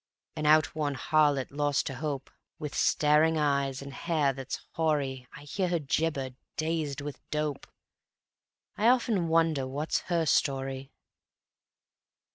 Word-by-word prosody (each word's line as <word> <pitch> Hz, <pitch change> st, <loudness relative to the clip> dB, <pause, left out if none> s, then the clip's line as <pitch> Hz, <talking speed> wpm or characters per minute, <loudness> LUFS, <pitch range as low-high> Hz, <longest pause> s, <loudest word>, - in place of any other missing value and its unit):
An 155 Hz, -1 st, -1 dB
outworn 155 Hz, -1 st, +3 dB
harlot, 145 Hz, -1 st, +2 dB
lost 145 Hz, 0 st, 0 dB
to 135 Hz, -, -3 dB
hope, 140 Hz, 0 st, -4 dB, 0.3 s
With 150 Hz, -2 st, -5 dB
staring 155 Hz, +2 st, +3 dB
eyes 140 Hz, -2 st, 0 dB
and 140 Hz, 0 st, -9 dB
hair 150 Hz, -3 st, +1 dB
that's 135 Hz, 0 st, -6 dB
hoary 140 Hz, -6 st, -1 dB
I 145 Hz, -, -12 dB
hear 180 Hz, +6 st, -1 dB
her 175 Hz, -, +1 dB
gibber, 145 Hz, -2 st, -1 dB, 0.3 s
dazed 155 Hz, -3 st, -1 dB
with 145 Hz, 0 st, -7 dB
dope: 150 Hz, -2 st, -2 dB, 1.1 s
I 215 Hz, -, +2 dB
often 230 Hz, -8 st, +3 dB
wonder 160 Hz, -4 st, +2 dB
what's 145 Hz, +4 st, -1 dB
her 170 Hz, -2 st, +2 dB
story. 135 Hz, -2 st, 0 dB
150 Hz, 125 wpm, -29 LUFS, 135-160 Hz, 1.1 s, outworn